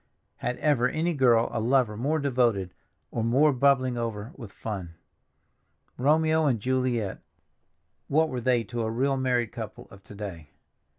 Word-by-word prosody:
Had 125 +1 -3
ever 130 -5 +2
any 165 +5 -1
girl 120 -5 +4
a 115 - -1
lover 120 -1 +2
more 140 +8 0
devoted 120 - +1 0.4
or 115 - -2
more 140 +6 +4
bubbling 130 -2 +2
over 115 0 -4
with 115 -7 -10
fun? 95 -6 -6 1.0
Romeo 155 +3 +3
and 120 -5 +1
Juliet—what 130 +5 -3
were 125 -3 -4
they 120 -1 +2
to 120 +3 -4
a 110 - -1
real 135 +5 +1
married 125 -3 0
couple - - -8
of 100 0 -15
to 105 - -12
day? 90 -8 -7
125 Hz, 150 wpm, -27 LUFS, 110-135 Hz, 1.0 s, girl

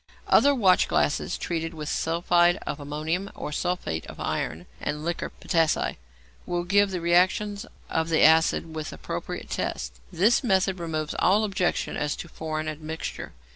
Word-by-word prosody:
Other 285 0 +5
watchglasses, 185 - +2
treated 165 -1 -3
with 150 -1 -6
sulphide 175 +2 +2
of 145 - -4
ammonium 155 +7 -3
or - - -5
sulphate 150 - -2
of - - -10
iron 80 +3 -3
and 150 +1 -3
liquor 170 0 -2
potassæ, 165 -2 +1 0.5
will 175 0 -1
give 200 +3 +3
the 185 -2 -3
reactions 190 +5 +2 0.2
of 160 0 -1
the 160 - +3
acid 160 0 +4
with 155 -1 -4
appropriate - - -6
tests. - - -3
This 215 +10 +3
method 190 -4 +2
removes 155 -2 -3
all 205 +4 +4
objections 195 -4 -1
as 150 -1 -1
to - - -7
foreign 155 -1 -4
admixture. 155 +1 -5
165 Hz, 145 wpm, -26 LUFS, 155-185 Hz, 0.5 s, Other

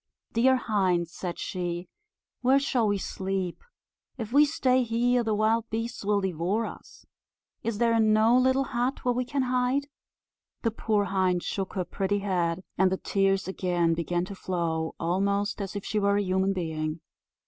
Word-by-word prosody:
"Dear 260 +3 +4
hind," 190 -8 +1
said 175 +1 -5
she, 175 -1 -3 0.5
"where 260 +2 +5
shall 260 -5 +1
we 205 -1 +1
sleep? 190 -2 -3 0.5
If 225 -1 -5
we 295 +2 +7
stay 260 -4 +2
here 240 +1 +2
the 220 -2 0
wild 220 +2 +1
beasts 230 +1 -4
will 205 0 +2
devour 190 +4 -1
us; - - -11 0.6
is 230 -2 -2
there 230 0 +3
no 220 +2 +4
little 260 +1 +3
hut 255 +1 -2
where 245 - +3
we 250 +1 -1
can 275 +1 -1
hide?" 255 +3 0 0.7
The 230 - +2
poor 215 -1 0
hind 185 -2 +1
shook 195 -1 -3
her 185 -2 -2
pretty 195 +3 -1
head, 180 -3 -1 0.2
and 190 -1 +4
the 190 - 0
tears 195 -1 +1
again 175 -3 +1
began 175 +1 -1
to 200 - -8
flow, 170 -4 -2
almost 200 +4 0
as 195 0 -5
if 200 - -4
she 215 - 0
were 200 0 +2
a 205 - +1
human 190 +1 +1
being. 160 -3 -3
200 Hz, 170 wpm, -27 LUFS, 185-235 Hz, 0.7 s, we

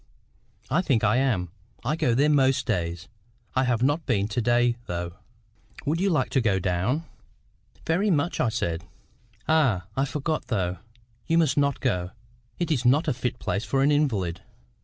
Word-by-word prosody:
"I 175 - +3
think 130 -11 +1
I 105 +2 +3
am. 110 -10 0 0.3
I 150 +5 +1
go 120 -7 +1
there 140 +4 +4
most 135 -3 +3
days. 85 -4 -2 0.5
I 130 0 +3
have 125 -1 +1
not 145 +4 +1
been 105 -6 +1
to 120 +3 -1
day, 120 +1 +3
though. 85 0 -4 0.7
Would 160 +4 0
you 195 - +2
like 150 -7 +1
to 135 - +2
go 105 -5 +2
down?" 95 - 0 0.8
"Very 185 +6 +1
much," 165 -1 +1
I 120 - +2
said. 85 -7 -2 0.6
"Ah! 135 - +2
I 135 - +1
forgot, 150 -1 -3
though. 95 -6 -1 0.5
You 165 - +3
must 155 -5 +3
not 140 -1 +1
go; 90 -9 0 0.5
it 170 -2 -1
is 130 -6 +1
not 145 +7 +3
a 145 - +2
fit 125 0 -3
place 100 - -2
for 135 +1 +1
an 145 - +4
invalid." 105 - 0
125 Hz, 175 wpm, -26 LUFS, 100-150 Hz, 0.8 s, there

